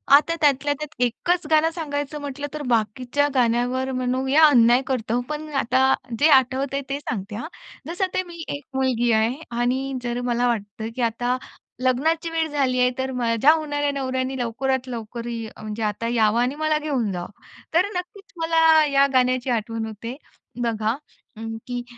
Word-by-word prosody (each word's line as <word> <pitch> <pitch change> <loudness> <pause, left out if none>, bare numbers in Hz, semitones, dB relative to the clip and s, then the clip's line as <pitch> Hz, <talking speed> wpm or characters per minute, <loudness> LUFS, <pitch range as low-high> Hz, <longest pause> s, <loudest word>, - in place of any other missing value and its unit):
आता 320 +3 +3
त्यातल्या 290 -1 +3
त्यात 300 -1 -7
एकच 345 +9 0
गाणं 315 0 +4
सांगायचं 295 -3 -4
म्हटलं 285 0 -5
तर 305 - -4
बाकीच्या 245 +5 +1
गाण्यांवर 250 +2 +1
म्हणूया 260 +4 +2
अन्याय 245 -3 +6
करतोय, 245 -2 -1
पण 305 +1 -4
आता 265 0 +3 0.3
जे 305 - +5
आठवतंय 265 +2 -1
ते 280 +1 -2
सांगते 210 -7 -5
हं. 240 +8 -5 0.4
जसं 355 +3 -1
ते 370 - 0
मी 340 -1 -8
एक 285 - -8
मुलगी 250 -3 +1
आहे 220 +2 +2 0.2
आणि 260 +3 0
जर 240 0 -2
मला 245 0 +1
वाटतंय 220 -1 -3
की 255 - -3
आता 245 +2 0 0.5
लग्नाची 315 +6 +1
वेळ 325 -1 0
झाली 270 -4 +1
आहे, 250 0 +4
तर 260 0 -2
माझ्या 240 +2 +3
होणाऱ्या 290 -2 -1
नवऱ्याने 260 -1 -2
लवकरात 260 +2 -1
लवकर 235 -1 -6 0.3
अ, - - -13
म्हणजे 215 +1 -5
आता 210 +2 -2
यावं 225 0 +3
आणि 250 +3 0
मला 310 0 +1
घेऊन 270 -9 -1
जावं. 175 0 -5 0.4
तर 345 +3 +4
नक्कीच 375 +3 -7
मला 325 -1 +5
या 280 -1 +4
गाण्याची 255 0 +2
आठवण 225 -1 -1
होते 220 +3 -7 0.5
बघा 225 -1 0 0.7
की 245 -1 -3
260 Hz, 160 wpm, -23 LUFS, 235-290 Hz, 0.7 s, अन्याय